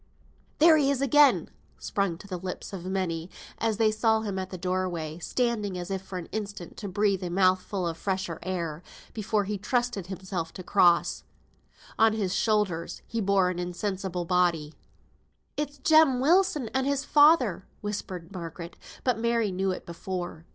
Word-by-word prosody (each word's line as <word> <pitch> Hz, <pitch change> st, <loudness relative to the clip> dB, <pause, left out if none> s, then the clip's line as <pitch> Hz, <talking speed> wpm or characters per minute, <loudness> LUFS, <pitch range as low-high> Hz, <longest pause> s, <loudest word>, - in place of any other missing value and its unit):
"There 320 Hz, +1 st, +7 dB
he 280 Hz, -2 st, +3 dB
is 280 Hz, -2 st, +1 dB
again!" 275 Hz, +1 st, +4 dB, 0.3 s
sprung 195 Hz, -5 st, -1 dB
to 200 Hz, -, -13 dB
the 185 Hz, -3 st, -5 dB
lips 185 Hz, +2 st, -6 dB
of 180 Hz, -2 st, -6 dB
many, 185 Hz, -3 st, -2 dB, 0.3 s
as 225 Hz, -2 st, 0 dB
they 220 Hz, -1 st, +3 dB
saw 220 Hz, 0 st, +2 dB
him 200 Hz, -3 st, -3 dB
at 185 Hz, 0 st, -4 dB
the 185 Hz, -, -6 dB
doorway, 175 Hz, -3 st, -2 dB
standing 210 Hz, -2 st, -1 dB
as 180 Hz, +2 st, -5 dB
if 190 Hz, -1 st, -2 dB
for 190 Hz, -1 st, -7 dB
an 175 Hz, -, -5 dB
instant 205 Hz, -4 st, -5 dB
to 205 Hz, -, -5 dB
breathe 200 Hz, -1 st, +1 dB
a 180 Hz, -, -3 dB
mouthful 185 Hz, +1 st, +1 dB
of 165 Hz, -1 st, -4 dB
the -, -, -19 dB
fresher 190 Hz, -4 st, -2 dB
air, 170 Hz, -4 st, -3 dB, 0.3 s
before 215 Hz, -1 st, 0 dB
he 205 Hz, 0 st, -3 dB
trusted 240 Hz, -4 st, -1 dB
himself 185 Hz, -3 st, -5 dB
to 185 Hz, -, -8 dB
cross. 175 Hz, -1 st, +3 dB, 0.8 s
On 220 Hz, 0 st, +5 dB
his 200 Hz, -4 st, -1 dB
shoulders 200 Hz, -5 st, 0 dB
he 230 Hz, -, -3 dB
bore 195 Hz, -2 st, +3 dB
an 175 Hz, -, -5 dB
insensible 180 Hz, 0 st, -3 dB
body. 170 Hz, -4 st, +1 dB, 0.8 s
"It's 290 Hz, 0 st, -3 dB
Jem 310 Hz, -2 st, +5 dB
Wilson 305 Hz, -, +3 dB
and 265 Hz, 0 st, +1 dB
his 280 Hz, 0 st, 0 dB
father," 290 Hz, -, +4 dB
whispered 190 Hz, -4 st, -5 dB
Margaret; 170 Hz, -2 st, -7 dB, 0.3 s
but 250 Hz, -4 st, +1 dB
Mary 230 Hz, -2 st, +1 dB
knew 190 Hz, +1 st, -1 dB
it 185 Hz, -, -4 dB
before. 175 Hz, -1 st, -6 dB
195 Hz, 170 wpm, -27 LUFS, 180-225 Hz, 0.8 s, There